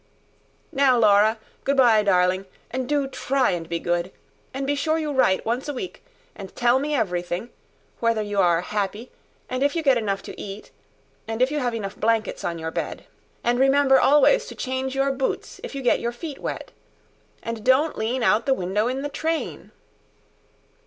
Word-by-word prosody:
"Now, 270 Hz, -2 st, +4 dB
Laura. 215 Hz, 0 st, +5 dB, 0.3 s
Good 280 Hz, 0 st, +1 dB
bye, 235 Hz, -5 st, +6 dB
darling. 185 Hz, -1 st, +2 dB, 0.2 s
And 255 Hz, +1 st, -3 dB
do 290 Hz, -2 st, +1 dB
try 270 Hz, 0 st, 0 dB
and 170 Hz, -2 st, -4 dB
be 170 Hz, -, -1 dB
good. 175 Hz, +2 st, -1 dB, 0.4 s
And 270 Hz, +1 st, -4 dB
be 285 Hz, -, +1 dB
sure 310 Hz, +3 st, 0 dB
you 305 Hz, -2 st, -2 dB
write 260 Hz, -9 st, +2 dB
once 240 Hz, +5 st, -1 dB
a 290 Hz, -, -3 dB
week. 365 Hz, +8 st, -7 dB, 0.3 s
And 195 Hz, -2 st, -10 dB
tell 245 Hz, +1 st, +3 dB
me 295 Hz, +2 st, -1 dB
everything. 180 Hz, -1 st, -2 dB, 0.5 s
Whether 230 Hz, -2 st, +1 dB
you 205 Hz, -1 st, -2 dB
are 175 Hz, -2 st, +4 dB
happy 210 Hz, +4 st, -3 dB, 0.4 s
and 255 Hz, +1 st, -3 dB
if 285 Hz, +2 st, +2 dB
you 330 Hz, -, -1 dB
get 270 Hz, -4 st, +4 dB
enough 195 Hz, -3 st, -2 dB
to -, -, -9 dB
eat 200 Hz, +1 st, -8 dB, 0.6 s
and 225 Hz, 0 st, -4 dB
if 255 Hz, +2 st, +3 dB
you 300 Hz, -, -1 dB
have 245 Hz, -3 st, -1 dB
enough 200 Hz, -3 st, -5 dB
blankets 225 Hz, 0 st, 0 dB
on 170 Hz, -, -2 dB
your 160 Hz, 0 st, -4 dB
bed. -, -, -4 dB, 0.4 s
And 240 Hz, +1 st, +1 dB
remember 270 Hz, 0 st, +5 dB
always 295 Hz, -, +4 dB
to -, -, -9 dB
change 260 Hz, 0 st, -3 dB
your 275 Hz, 0 st, +2 dB
boots 270 Hz, 0 st, -3 dB
if -, -, -7 dB
you 275 Hz, -, -4 dB
get 245 Hz, -, +3 dB
your 235 Hz, -, -2 dB
feet 285 Hz, +3 st, -7 dB
wet. -, -, -5 dB, 0.7 s
And 230 Hz, -2 st, -5 dB
don't 265 Hz, +6 st, +3 dB
lean 235 Hz, +3 st, -1 dB
out 215 Hz, -1 st, +4 dB
of -, -, -18 dB
the 270 Hz, -1 st, +3 dB
window 195 Hz, +3 st, -1 dB
in 260 Hz, +2 st, -2 dB
the -, -, -1 dB
train." 320 Hz, +2 st, -3 dB
240 Hz, 190 wpm, -24 LUFS, 205-270 Hz, 0.7 s, bye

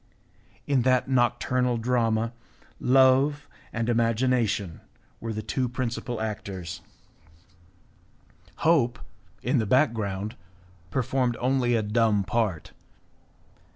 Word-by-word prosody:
In 140 Hz, -3 st, +2 dB
that 130 Hz, +1 st, +2 dB
nocturnal 125 Hz, -1 st, +1 dB
drama 115 Hz, -1 st, 0 dB, 0.5 s
love 135 Hz, +3 st, +4 dB, 0.2 s
and 115 Hz, 0 st, -2 dB
imagination 115 Hz, -5 st, +1 dB, 0.4 s
were 115 Hz, -, -4 dB
the 110 Hz, 0 st, -4 dB
two 125 Hz, +3 st, -1 dB
principal 120 Hz, -1 st, -3 dB
actors; 100 Hz, -5 st, -5 dB, 1.8 s
hope, 145 Hz, -8 st, +3 dB, 0.5 s
in -, -, +2 dB
the 110 Hz, -, -1 dB
background, 110 Hz, -5 st, +1 dB, 0.5 s
performed 125 Hz, +1 st, 0 dB
only 125 Hz, -1 st, +1 dB
a 110 Hz, -, +1 dB
dumb 105 Hz, -1 st, +2 dB
part. 105 Hz, -5 st, -1 dB
120 Hz, 90 wpm, -26 LUFS, 110-130 Hz, 1.8 s, love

